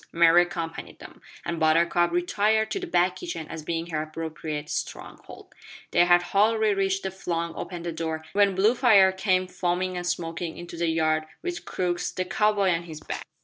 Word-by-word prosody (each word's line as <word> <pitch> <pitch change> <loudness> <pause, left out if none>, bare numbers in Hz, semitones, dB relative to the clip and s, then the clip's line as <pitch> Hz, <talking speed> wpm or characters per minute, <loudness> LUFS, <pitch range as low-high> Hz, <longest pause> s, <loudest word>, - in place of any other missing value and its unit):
Mary 170 +1 +6
accompanied 170 -2 -5
them, - - -13 0.2
and 170 -1 -3
Buttercup 170 +2 +3
retired 220 -11 +1
to 390 - -1
the 370 - -6
back 180 - +2
kitchen 345 - -6
as 165 - -6
being 165 +1 -3
her 155 -1 -1
appropriate 155 -1 -5
stronghold. - - -7 0.4
They 175 - +5
had 175 0 +5
hardly 215 +3 +2
reached 195 0 0
and 190 - -3
flung 170 -3 -3
open 175 -2 -6
the 170 - -3
door 160 -1 -4
when 200 -1 +3
Bluefire 210 -1 +5
came 185 -1 +1
foaming 185 0 -2
and 175 0 -4
smoking 165 -1 -3
into 175 0 -8
the 170 0 -1
yard 155 -1 +1 0.2
with 350 -1 -4
Crux 175 -1 -2
the 185 - -3
cow 210 +2 +2
boy 200 -3 +2
on 170 0 -1
his 160 -3 -8
back. - - -6
175 Hz, 185 wpm, -26 LUFS, 165-195 Hz, 0.4 s, Mary